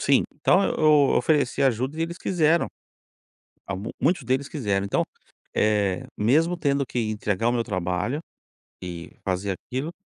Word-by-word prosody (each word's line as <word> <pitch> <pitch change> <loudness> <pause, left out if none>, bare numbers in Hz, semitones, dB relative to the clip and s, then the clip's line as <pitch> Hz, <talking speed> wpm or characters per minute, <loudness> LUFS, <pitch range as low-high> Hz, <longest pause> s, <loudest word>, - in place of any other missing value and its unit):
Sim, 140 -1 +4
então, 185 +6 +3
eu - - 0
eu 155 -1 +5 0.2
ofereci 145 -4 +2
ajuda 130 +3 +1
e 165 - +1
eles 170 +2 -4
quiseram. 170 -2 +2 1.0
Ah, 95 - -3
mu 100 +4 -5
muitos 170 +7 +2
deles 135 +2 0
quiseram. 100 -10 -1
Então, 100 - +1 0.5
eh, 105 -3 +1
mesmo 160 +11 +3
tendo 140 -3 +1
que 125 - -4
entregar 105 +1 0
o 120 - +2
meu 120 -1 0
trabalho 90 - -2 0.6
e 85 -2 -7
fazer 95 +1 -1
aquilo, 135 +6 -3
125 Hz, 155 wpm, -25 LUFS, 100-150 Hz, 1.0 s, eu